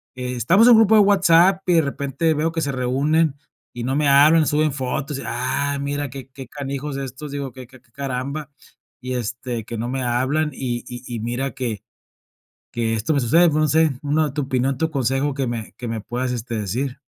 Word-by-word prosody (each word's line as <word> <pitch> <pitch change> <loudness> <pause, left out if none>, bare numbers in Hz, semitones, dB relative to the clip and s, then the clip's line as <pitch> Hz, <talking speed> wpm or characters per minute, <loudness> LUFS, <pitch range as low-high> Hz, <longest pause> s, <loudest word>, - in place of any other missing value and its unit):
Estamos 125 - +3
en 245 - +9
un 225 - +7
grupo 220 0 +5
de 210 - +7
WhatsApp 190 -1 +4
y 175 - +4
de 165 - +6
repente 140 +3 -1
veo 155 +2 0
que 165 - -2
se 140 -2 -1
reúnen 140 +4 +1 0.4
y 120 -1 -5
no 130 +2 -1
me 145 -1 +2
hablan, 150 +3 +6
suben 150 -1 +1
fotos, 135 +1 -3
y: - - -7
"Ah, 140 +4 -1
mira 145 0 -2
qué 135 0 -9
qué 130 -1 -10
canijos 140 0 -5
estos", 140 +2 -6
digo: 140 -4 -5
"Que 130 -2 -10
que 130 0 -16
que - - -37
que 120 - -31
caramba", 140 +2 -4 0.5
y 130 0 -4
este, 120 -1 -4
que 115 - -6
no 115 +2 -3
me 130 0 -2
hablan 130 +6 0
y 120 -3 -3
y 125 0 -8
y - - -4
mira 120 +4 -2
que 120 -7 -4 0.9
que 115 -1 -1
esto 115 +8 -1
me 140 - +2
sucede, 165 +9 +4
no 155 0 +1
sé 160 0 +3
una, 150 0 +1
tu 150 - -1
opinión, 130 0 -1
tu 160 +1 0
consejo 135 +1 0
que 135 -2 -2
me 115 -2 -5
que 125 - -7
me 115 -1 -3
puedas, 125 +4 -3
este 120 -1 -4
decir. 125 +6 -3
135 Hz, 215 wpm, -21 LUFS, 125-150 Hz, 0.9 s, en